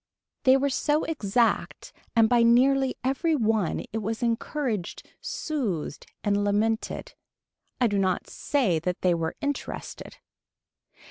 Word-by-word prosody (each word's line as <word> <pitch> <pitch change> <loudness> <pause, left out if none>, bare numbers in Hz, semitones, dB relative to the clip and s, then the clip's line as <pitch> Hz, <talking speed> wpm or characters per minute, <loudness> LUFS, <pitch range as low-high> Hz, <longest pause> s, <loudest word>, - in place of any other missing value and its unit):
They 260 0 +7
were 280 +1 0
so 295 +3 +1
exact 235 -6 0 0.2
and 225 -1 +6
by 240 +1 +4
nearly 260 +3 +4
every 290 +5 +1
one 220 - +1
it 225 - -1
was 225 +3 -3
encouraged 230 - -2
soothed 215 - -3 0.2
and 205 -1 +1
lamented. 215 +2 -1 0.7
I 250 - +3
do 205 -3 +1
not 190 -2 0
say 230 - 0
that 180 +2 -3
they 180 -1 +4
were 165 -1 -2
interested. 285 -1 -5
230 Hz, 125 wpm, -26 LUFS, 200-270 Hz, 0.7 s, They